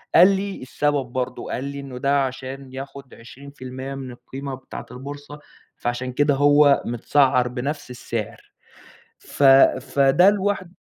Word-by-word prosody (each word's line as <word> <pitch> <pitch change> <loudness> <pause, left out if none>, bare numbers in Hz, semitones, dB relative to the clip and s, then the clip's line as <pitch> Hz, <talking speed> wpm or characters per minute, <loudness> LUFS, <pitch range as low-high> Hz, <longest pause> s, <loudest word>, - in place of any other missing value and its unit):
قال 180 +3 +9
لي 195 -3 -4
السبب 145 +1 -1
برضه، 125 +1 -4
قال 130 - -3
لي: 140 0 -5
"إنه 135 -2 -8
ده 140 +1 +2
عشان 130 0 -7
ياخُد 135 0 -9
20% 130 +2 -9
من 130 -2 -7
القيمة 130 +3 -7
بتاعة 130 - -9
البورصة 145 +3 -9 0.4
فعشان 120 +1 -3
كده 145 +1 +2
هو 145 0 +5
مِتسعّر 125 +1 +2
بنفس 130 +3 -4
السعر." 115 -3 -6 0.7
ف - - -7 0.4
فده 140 +8 +4
لوحد 195 -3 -2
135 Hz, 135 wpm, -22 LUFS, 130-145 Hz, 0.7 s, قال